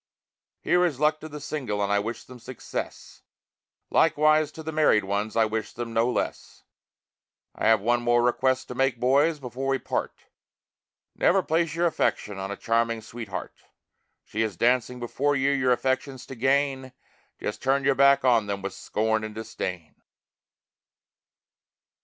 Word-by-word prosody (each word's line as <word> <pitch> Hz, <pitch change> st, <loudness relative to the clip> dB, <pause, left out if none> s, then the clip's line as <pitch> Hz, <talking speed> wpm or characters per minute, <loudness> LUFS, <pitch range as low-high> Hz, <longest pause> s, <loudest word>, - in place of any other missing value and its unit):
Here 180 Hz, 0 st, +3 dB
is 155 Hz, -7 st, 0 dB
luck 155 Hz, +1 st, +2 dB
to 155 Hz, -, -9 dB
the 150 Hz, 0 st, -8 dB
single 135 Hz, -8 st, -4 dB
and 100 Hz, 0 st, 0 dB
I 100 Hz, -, +3 dB
wish 115 Hz, +2 st, -5 dB
them 125 Hz, -1 st, -13 dB
success, 125 Hz, +1 st, -7 dB, 0.7 s
Likewise 155 Hz, 0 st, +3 dB
to 160 Hz, -, -9 dB
the 160 Hz, -, -4 dB
married 150 Hz, -9 st, +3 dB
ones, 100 Hz, +2 st, -2 dB
I 115 Hz, -1 st, +4 dB
wish 110 Hz, 0 st, -3 dB
them 120 Hz, -1 st, -6 dB
no 115 Hz, +2 st, +2 dB
less. 125 Hz, -, -4 dB, 0.9 s
I -, -, -1 dB
have 110 Hz, -2 st, +5 dB
one 120 Hz, +3 st, +1 dB
more 120 Hz, 0 st, +3 dB
request 130 Hz, +2 st, +1 dB
to -, -, -4 dB
make, 130 Hz, -1 st, 0 dB
boys, 140 Hz, +6 st, +3 dB
before 130 Hz, 0 st, -5 dB
we 135 Hz, 0 st, +2 dB
part. -, -, -4 dB, 0.9 s
Never 190 Hz, +1 st, +3 dB
place 165 Hz, 0 st, 0 dB
your 170 Hz, +1 st, +1 dB
affection 105 Hz, -, -1 dB
on 95 Hz, 0 st, -4 dB
a 100 Hz, -, -5 dB
charming 115 Hz, 0 st, 0 dB
sweetheart. 110 Hz, -3 st, -7 dB, 0.7 s
She 110 Hz, -, -3 dB
is 110 Hz, -5 st, -2 dB
dancing 125 Hz, +2 st, +1 dB
before 140 Hz, +4 st, 0 dB
you 135 Hz, +1 st, +2 dB
your 130 Hz, -2 st, +2 dB
affections 130 Hz, +1 st, -1 dB
to 135 Hz, -, -9 dB
gain; 135 Hz, +1 st, 0 dB, 0.5 s
Just 105 Hz, -, -4 dB
turn 135 Hz, +1 st, +1 dB
your 140 Hz, 0 st, +3 dB
back 140 Hz, 0 st, +4 dB
on 115 Hz, -4 st, +3 dB
them 100 Hz, -1 st, -4 dB
with 100 Hz, -, -4 dB
scorn 110 Hz, 0 st, -1 dB
and 110 Hz, -1 st, -6 dB
disdain. 90 Hz, -8 st, -5 dB
125 Hz, 160 wpm, -26 LUFS, 110-140 Hz, 0.9 s, have